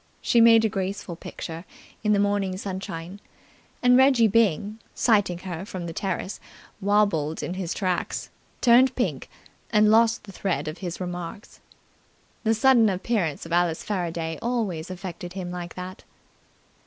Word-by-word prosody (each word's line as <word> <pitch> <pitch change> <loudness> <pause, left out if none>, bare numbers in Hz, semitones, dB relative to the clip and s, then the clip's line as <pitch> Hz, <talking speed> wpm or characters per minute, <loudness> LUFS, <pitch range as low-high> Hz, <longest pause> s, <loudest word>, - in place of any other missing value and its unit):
She 235 - +3
made 230 -1 +7
a - - +5
graceful 195 -3 -4
picture 165 0 -7 0.4
in 210 - +2
the 205 - +4
morning 200 -2 0
sunshine, 190 -1 -6 0.6
and 250 0 +6
Reggie 260 -3 +6
Byng, 210 -1 +1 0.2
sighting 205 -7 +2
her 180 -1 -6
from 185 -3 -6
the 165 - -5
terrace, 190 +1 -3 0.4
wobbled 195 -7 +1
in 175 - -3
his 185 -2 -4
tracks, 185 -3 -2 0.3
turned 255 +2 +5
pink, - - -2 0.4
and 210 -1 +4
lost 230 +1 +4
the 205 - -11
thread 190 -4 -2
of 155 +3 -5
his 180 -3 -5
remarks. 180 +2 -6 0.8
The 225 -1 +2
sudden 235 -1 +5
appearance 185 -5 -1
of - - -10
Alice 170 -2 +1
Faraday 170 -4 -3
always 210 -9 -2
affected 180 -1 -7
him 180 -2 -5
like 175 -1 -6
that. 185 +1 -8
190 Hz, 145 wpm, -25 LUFS, 175-220 Hz, 0.8 s, made